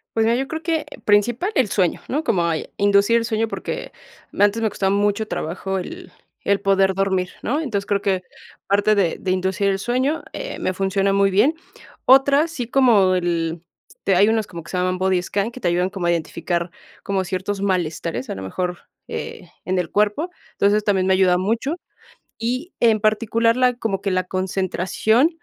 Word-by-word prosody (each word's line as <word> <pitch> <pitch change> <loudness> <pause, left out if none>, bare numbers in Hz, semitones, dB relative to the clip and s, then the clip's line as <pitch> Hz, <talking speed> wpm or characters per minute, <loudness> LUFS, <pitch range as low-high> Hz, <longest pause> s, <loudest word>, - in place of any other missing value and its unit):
Pues 225 -1 +3
mira, 235 - +3
yo 270 +1 -2
creo 320 0 -5
que 320 -3 -1 0.2
principal 230 - +2
el 255 -7 +2
sueño, 180 -4 +1
¿no? 300 +4 -1
Como 180 - +1
hay 165 -2 -2
inducir 200 +3 +4
el 230 - 0
sueño, 225 -1 0
porque - - -5 0.4
me - - +1
antes 205 +3 +3
me 220 - +2
costaba 195 -1 0
mucho 205 +1 +1
trabajo 190 +3 -3
el 180 - -8 0.3
el 200 0 +2
poder 195 -1 +3
dormir, 190 -1 0
¿no? 290 +6 -1
Entonces, 205 -9 -2
creo 200 -1 +1
que, 195 -3 0 0.5
parte 205 +2 +3
de 185 -5 +1
de 185 - -2
inducir 190 +2 0
el 195 - 0
sueño 255 +8 0
eh, - - -5
me 185 - -1
funciona 195 +1 0
muy 195 0 +3
bien. 230 +12 +3 0.5
Otra, 275 +4 +5
sí, 250 -8 -5
como 220 -9 +4
el 170 -2 -1 0.3
Este, 195 - -1
hay 200 +3 +5
unos 220 -1 +1
como 170 -3 -8
que 150 - -14
se 185 - -3
llaman 185 0 0
Body 185 -1 +2
Scan, 200 +5 -2
que 255 +1 -11
te 175 - +1
ayudan 180 +2 +1
como 190 -2 -4
a - - +3
identificar, 170 +1 -2 0.3
como 195 -1 -1
ciertos 190 +2 -3
malestares, 170 -7 -2
a - - -3
lo 95 - -7
mejor, 180 - -3 0.3
eh, - - -6 0.2
en 185 +2 0
el 170 -3 -2
cuerpo. 210 - +1 0.2
Entonces, 205 +1 +2
también 190 -3 +1
me 190 - +4
ayuda 185 -1 +4
mucho. 230 - -1 0.6
Y, 255 +10 -3
en 225 -2 +4
particular, 230 +2 +2
la 250 -1 +3
como 220 -5 -2
que 200 -1 -1
la 185 0 +1
concentración, 190 - +1
200 Hz, 195 wpm, -21 LUFS, 185-230 Hz, 0.6 s, Otra